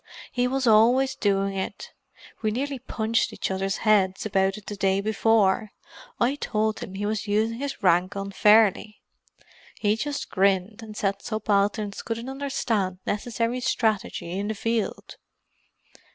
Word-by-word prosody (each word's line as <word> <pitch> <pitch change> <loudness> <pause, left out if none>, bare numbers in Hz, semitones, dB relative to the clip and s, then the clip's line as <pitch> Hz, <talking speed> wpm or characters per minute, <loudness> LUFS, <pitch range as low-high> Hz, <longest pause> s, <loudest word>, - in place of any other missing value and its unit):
He 245 0 +1
was 265 +1 -1
always 245 +4 +5
doing 195 -3 0
it: 190 - -5 0.5
we 215 - +1
nearly 270 +4 -3
punched 230 -2 -1
each - - -3
other's 195 +1 -1
heads 195 -3 +3
about 195 -1 +1
it 210 - -12
the 205 - -5
day 195 -1 +1
before—I 220 - 0
told 215 -4 -1
him 190 - -7
he 205 +1 -3
was 215 0 -2
using 220 +3 0
his 280 -5 -5
rank 180 +2 +3
unfairly. 210 +1 +3 0.8
He 210 0 +2
just 285 +5 -4
grinned 195 +3 +1
and 215 -1 -10
said 195 0 -1
subalterns 205 -1 0
couldn't 230 +2 -4
understand 235 -9 -1
necessary 230 +3 -1
strategy 220 -8 -1
in 200 +3 -2
the 220 - -2
field!" 225 0 -3
215 Hz, 140 wpm, -25 LUFS, 195-230 Hz, 0.8 s, always